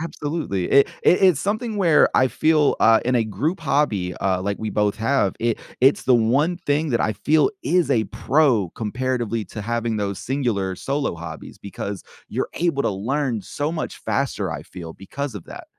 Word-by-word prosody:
Absolutely. 150 Hz, -, -3 dB
It 140 Hz, -, +5 dB
it 180 Hz, -, +4 dB
It's 185 Hz, -7 st, +5 dB
something 215 Hz, +4 st, -2 dB
where 170 Hz, -6 st, +4 dB
I 130 Hz, -, +5 dB
feel, 155 Hz, +2 st, +2 dB
uh, 115 Hz, 0 st, +6 dB
in 125 Hz, +1 st, +1 dB
a 120 Hz, -, +3 dB
group 135 Hz, -, -2 dB
hobby, 135 Hz, -, 0 dB
uh, 95 Hz, -1 st, 0 dB
like 100 Hz, +1 st, -2 dB
we 110 Hz, -1 st, -3 dB
both 105 Hz, -1 st, 0 dB
have, 115 Hz, -3 st, +1 dB
it 115 Hz, -1 st, 0 dB, 0.2 s
it's 135 Hz, +2 st, +4 dB
the 130 Hz, -, +4 dB
one 135 Hz, +10 st, +2 dB
thing 155 Hz, -1 st, -1 dB
that 120 Hz, -, +1 dB
I 110 Hz, -, +1 dB
feel 150 Hz, -, +2 dB
is 180 Hz, -1 st, +1 dB
a 110 Hz, -2 st, +2 dB
pro 125 Hz, -, +1 dB
comparatively 115 Hz, -1 st, -2 dB
to 110 Hz, -, -7 dB
having 115 Hz, 0 st, -2 dB
those 100 Hz, -2 st, -2 dB
singular 115 Hz, -9 st, -1 dB
solo 140 Hz, +1 st, -2 dB
hobbies 80 Hz, -1 st, -9 dB
because 100 Hz, 0 st, -6 dB, 0.3 s
you're -, -, -2 dB
able 165 Hz, -5 st, 0 dB
to -, -, +1 dB
learn 120 Hz, +3 st, -2 dB
so 145 Hz, +8 st, -3 dB
much 165 Hz, -1 st, -4 dB
faster, 115 Hz, -9 st, -2 dB
I 75 Hz, -2 st, -5 dB
feel, 85 Hz, -1 st, -9 dB
because 135 Hz, +7 st, -6 dB
of 100 Hz, -, -8 dB
that. -, -, -10 dB
120 Hz, 185 wpm, -22 LUFS, 100-145 Hz, 0.3 s, uh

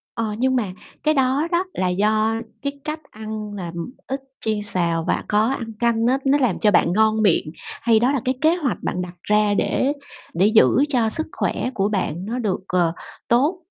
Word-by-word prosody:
Ờ, 220 Hz, -2 st, -2 dB
nhưng 260 Hz, +1 st, +2 dB
mà 240 Hz, -, +1 dB, 0.4 s
cái 310 Hz, 0 st, +2 dB
đó 270 Hz, +4 st, +2 dB
đó 350 Hz, +2 st, +2 dB
là 185 Hz, -1 st, 0 dB
do 215 Hz, +4 st, +2 dB, 0.3 s
cái 280 Hz, 0 st, -2 dB
cách 310 Hz, 0 st, -4 dB
ăn 215 Hz, -1 st, -6 dB
làm 175 Hz, -4 st, -6 dB, 0.3 s
ít 270 Hz, +1 st, -3 dB, 0.2 s
chiên 215 Hz, -1 st, -1 dB
xào 170 Hz, -5 st, 0 dB
và -, -, 0 dB
có 210 Hz, +1 st, +3 dB
ăn 225 Hz, -2 st, -6 dB
canh 235 Hz, -1 st, +2 dB
á 260 Hz, +2 st, +3 dB
nó 285 Hz, +2 st, +4 dB
làm 250 Hz, -9 st, +1 dB
cho 210 Hz, -, +4 dB
bạn 175 Hz, -2 st, +3 dB
ngon 220 Hz, +1 st, +3 dB
miệng 170 Hz, -6 st, +2 dB, 0.3 s
hay 225 Hz, -2 st, +3 dB
đó 255 Hz, +4 st, +3 dB
là 275 Hz, -, 0 dB
cái 255 Hz, +1 st, +1 dB
kế 320 Hz, +3 st, +4 dB
hoạch 285 Hz, -8 st, -1 dB
bạn 180 Hz, -, -2 dB
đặt 175 Hz, 0 st, -7 dB
ra 210 Hz, -1 st, +2 dB
để 270 Hz, +7 st, +1 dB, 0.4 s
để 185 Hz, +4 st, +3 dB
giữ 220 Hz, +1 st, +6 dB, 0.2 s
cho 240 Hz, -6 st, +2 dB
sức 315 Hz, +7 st, -1 dB
khỏe 250 Hz, -, -1 dB
của 195 Hz, +1 st, +1 dB
bạn 185 Hz, -3 st, -2 dB
nó 240 Hz, +3 st, -3 dB
được, 205 Hz, -7 st, -1 dB
ờ, 175 Hz, -2 st, +2 dB, 0.4 s
tốt? 290 Hz, +10 st, +2 dB
220 Hz, 205 wpm, -22 LUFS, 205-260 Hz, 0.4 s, giữ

